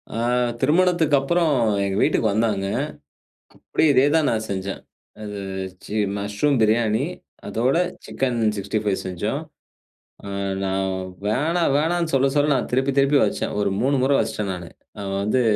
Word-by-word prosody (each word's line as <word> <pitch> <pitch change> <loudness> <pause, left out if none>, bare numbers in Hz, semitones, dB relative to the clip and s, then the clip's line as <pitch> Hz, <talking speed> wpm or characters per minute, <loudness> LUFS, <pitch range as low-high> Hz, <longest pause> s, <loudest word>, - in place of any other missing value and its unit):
ஆ - - -3 0.4
திருமணத்துக்கப்புறம் 160 0 +3 0.3
எங்க 95 0 -1
வீட்டுக்கு 110 - +2
வந்தாங்க. 105 -2 0 0.9
அப்டியே 155 - +1
இதே 130 +2 +5
தான் 155 -3 +3
நான் 110 -1 -1
செஞ்சேன். 100 0 -4 0.4
அது 105 -1 -6 0.5
சி - - -7 0.2
மஷ்ரூம் 105 +8 0
பிரியாணி 110 0 +2 0.4
அதோட 125 +7 +1 0.3
சிக்கன் 125 -3 -2 0.2
65 100 +1 -1
செஞ்சோம். 105 - -2 1.2
நான் 95 0 0 0.4
"வேணா 160 +10 +1
வேணான்னு" 165 +1 0
சொல்ல 135 0 +4
சொல்ல 145 0 +3
நான் - - -2
திருப்பி 135 +2 +2
திருப்பி 140 +1 +4
வச்சேன். - - -2
ஒரு 100 -1 +1
3 140 +2 +2
முற 135 +2 +2
வச்சுட்டேன் 105 -2 -1
நானு. 90 -2 -8 0.3
நான் 100 -1 -4
வந்து 115 +5 +2
125 Hz, 130 wpm, -22 LUFS, 105-145 Hz, 1.2 s, இதே